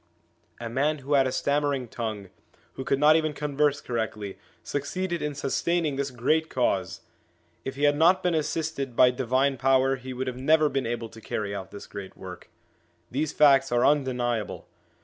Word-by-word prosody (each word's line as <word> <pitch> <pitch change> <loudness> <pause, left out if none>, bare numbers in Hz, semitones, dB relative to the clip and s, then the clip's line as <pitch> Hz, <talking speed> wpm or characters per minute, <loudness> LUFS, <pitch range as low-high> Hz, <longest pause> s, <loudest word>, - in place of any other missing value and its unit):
A 120 - -5
man 140 +6 0
who 140 +1 -4
had 135 -2 +4
a - - -2
stammering 140 -2 0
tongue, 110 -4 -5 0.4
who 130 - -6
could 135 - +1
not 150 +2 +6
even 155 -1 +1
converse 145 0 0
correctly, 110 -4 -4 0.2
succeeded 175 +5 -3
in 150 -1 -3
sustaining 155 +2 0
this 140 0 -2
great 145 +6 0
Cause! 110 -7 -1 0.6
If 135 - -5
he 140 - -4
had 145 0 +4
not 170 +5 +4
been 180 -1 +1
assisted 155 -4 -2
by 125 +1 +6
divine 130 +2 +1
power 135 +1 +3
he 130 0 -8
would 130 +1 -3
never 155 +5 +3
have 145 - 0
been 135 -3 0
able 115 -1 -3
to 115 0 -13
carry 105 -1 -3
out 95 -2 -6
this 100 - -10
great 100 -2 -9
work. 90 -1 -10 0.6
These 145 +4 -1
facts 135 -3 +5
are 120 0 +3
undeniable. 125 -6 0
135 Hz, 175 wpm, -26 LUFS, 120-150 Hz, 0.6 s, not